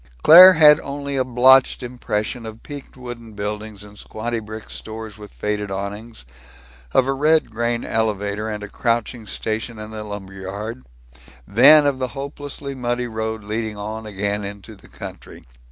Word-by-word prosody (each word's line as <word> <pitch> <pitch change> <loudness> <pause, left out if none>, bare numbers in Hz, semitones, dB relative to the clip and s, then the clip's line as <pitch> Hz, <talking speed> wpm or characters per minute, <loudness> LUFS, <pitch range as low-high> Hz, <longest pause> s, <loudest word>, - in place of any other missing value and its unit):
Claire 180 +5 +11
had 150 -3 +7
only 140 0 -5
a 130 - +2
blotched 130 +2 +4
impression 120 -1 -3
of 110 0 -9
peaked 145 -2 -10
wooden 120 -3 -9
buildings 105 0 -5
and 105 0 -13
squatty 115 +2 -4
brick 110 0 -9
stores 110 -1 -8
with 105 -1 -11
faded 105 -1 -3
awnings; 100 - -6 0.7
of 130 - +3
a 135 - 0
red 155 0 +2
grain 120 +1 -2
elevator 105 -1 -1
and 105 -1 -5
a - - -6
crouching 115 +1 -2
station 110 +2 -4
and 110 0 -8
a 110 -1 -6
lumberyard; 100 +3 -7 0.6
then 145 +8 +7
of 140 -2 +1
the 130 - -1
hopelessly 140 0 -6
muddy 125 -1 -2
road 110 -1 -4
leading 110 0 -4
on 110 +2 -6
again 100 0 -2
into 100 +2 -8
the 100 - -18
country. - - -10
110 Hz, 155 wpm, -21 LUFS, 105-125 Hz, 0.7 s, Claire